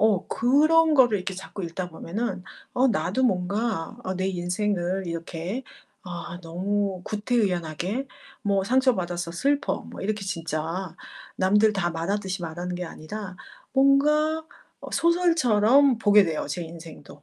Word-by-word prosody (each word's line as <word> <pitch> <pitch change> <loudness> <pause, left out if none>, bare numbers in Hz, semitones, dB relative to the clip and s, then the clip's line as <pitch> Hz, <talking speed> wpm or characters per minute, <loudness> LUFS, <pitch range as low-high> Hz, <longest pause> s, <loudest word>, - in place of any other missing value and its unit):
어 210 -3 +3
그런 310 +6 +4
거를 245 -7 +5
이렇게 190 +1 -4
자꾸 190 0 -7
읽다 175 +2 -4
보면은 185 +4 -4 0.3
어 255 +2 +3
나도 195 +3 0
뭔가 200 -3 -1
아 185 - -2
내 185 +1 -1
인생을 185 0 -1
이렇게 170 +7 -4 0.4
아 175 -1 -7
너무 190 +3 -2
구태의연하게 205 - -1 0.4
뭐 200 -1 +1
"상처받아서 185 -9 +1
슬퍼." 280 - 0
뭐 - - -10
이렇게 210 0 -2
진짜 165 0 -3 0.4
남들 210 +3 +4
다 175 -4 0
말하듯이 185 +2 -2
말하는 175 +2 -4
게 180 - -4
아니라 190 +4 -7 0.4
뭔가 300 +4 +3 0.4
어 - - -9
소설처럼 280 -7 +4
보게 205 -2 +6
돼요 160 -3 -2
제 170 +4 -3
인생도. 160 -3 -11
195 Hz, 280 characters per minute, -25 LUFS, 175-235 Hz, 0.4 s, 보게